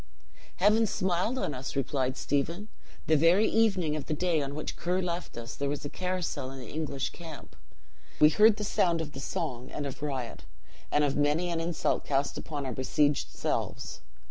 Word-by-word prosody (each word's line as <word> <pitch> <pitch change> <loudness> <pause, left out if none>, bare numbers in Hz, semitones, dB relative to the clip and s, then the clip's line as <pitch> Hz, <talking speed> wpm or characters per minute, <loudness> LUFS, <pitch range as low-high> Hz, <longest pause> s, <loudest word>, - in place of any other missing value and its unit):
"Heaven 215 +4 +4
smiled 190 +6 0
on 155 - -1
us!" 130 +1 -5
replied 135 -1 0
Stephen. 170 +9 -1 0.4
"The 155 - +4
very 170 +8 +5
evening 195 -9 +2
of 150 - -5
the 155 - 0
day 170 -1 +1
on 140 0 -4
which 155 - -4
Ker 180 +2 0
left 175 -5 -3
us 115 +1 -6
there 140 0 -2
was 145 0 -3
a 145 - -4
carousal 180 -7 -2
in 135 - -8
the 125 - -8
English 150 -3 -2
camp. 165 -4 -10 0.6
We 150 - +8
heard 210 +6 +6
the 210 - -3
sound 170 -4 +2
of 160 -2 -4
the 135 - -8
song 130 -3 -3
and 145 - -4
of 140 0 -6
riot, 135 -5 -4 0.5
and 150 - +3
of 140 -2 +1
many 150 +5 +2
an 165 - 0
insult 165 0 0
cast 140 0 0
upon 145 -3 -4
our 130 - -2
besieged 145 +3 +1
selves. - - -3
155 Hz, 190 wpm, -29 LUFS, 140-180 Hz, 0.6 s, We